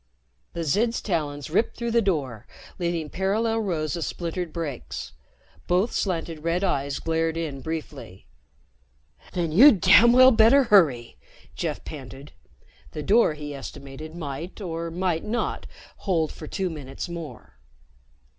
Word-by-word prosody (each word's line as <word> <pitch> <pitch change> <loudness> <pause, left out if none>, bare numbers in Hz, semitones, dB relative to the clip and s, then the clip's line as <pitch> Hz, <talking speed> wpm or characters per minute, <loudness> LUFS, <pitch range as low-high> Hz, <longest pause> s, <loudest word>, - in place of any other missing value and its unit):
The 170 - -3
Zid's 220 +10 +1
talons 150 -6 -3
ripped 200 +7 +1
through 235 -1 -2
the 235 0 +3
door, 140 - -2 0.3
leaving 170 -3 -1
parallel 220 +4 0
rows 160 -8 -2
of 170 - -3
splintered 170 0 -4
breaks. 140 - -6 0.5
Both 185 +6 +2
slanted 165 -4 -2
red 170 +3 0
eyes 140 -6 0
glared 165 0 -1
in 150 -5 -4
briefly. 150 - -7 1.1
"Then 170 -3 -1
you'd 225 - +7
damn 235 +7 +7
well 255 +1 +8
better 230 +4 +6
hurry," 155 - +3 0.4
Jeff - - -4
panted. 135 0 -9 0.6
The 150 - -5
door, 205 -5 +4
he 150 -1 -7
estimated, 140 +3 -9
might 155 +3 -6
or 170 -3 -4
might 175 -1 -1
not 235 +3 -3 0.3
hold 165 -6 0
for 155 - -9
two 190 0 -2
minutes 140 0 -7
more. 170 -3 -9
165 Hz, 135 wpm, -25 LUFS, 150-195 Hz, 1.1 s, well